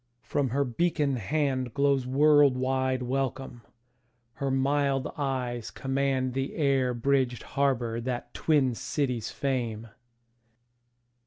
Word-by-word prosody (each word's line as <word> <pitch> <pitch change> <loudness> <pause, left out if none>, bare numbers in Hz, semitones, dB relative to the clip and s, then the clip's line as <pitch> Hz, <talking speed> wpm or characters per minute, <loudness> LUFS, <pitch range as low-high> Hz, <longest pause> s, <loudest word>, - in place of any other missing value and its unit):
From 140 -3 -1
her 140 +4 +1
beacon 145 +1 0
handGlows 135 +1 0
world 145 0 +5
wide 130 0 0
welcome; 130 -1 -3 0.7
her 140 +1 -3
mild 135 0 +1
eyes 125 -5 -2
commandThe 135 -1 -1
air 135 -5 +1
bridged 125 -1 +1
harbour 120 -4 0
that 125 0 -4
twin 140 -6 +2
cities 125 -2 -2
frame. 115 -5 -3
130 Hz, 95 wpm, -28 LUFS, 125-140 Hz, 0.7 s, world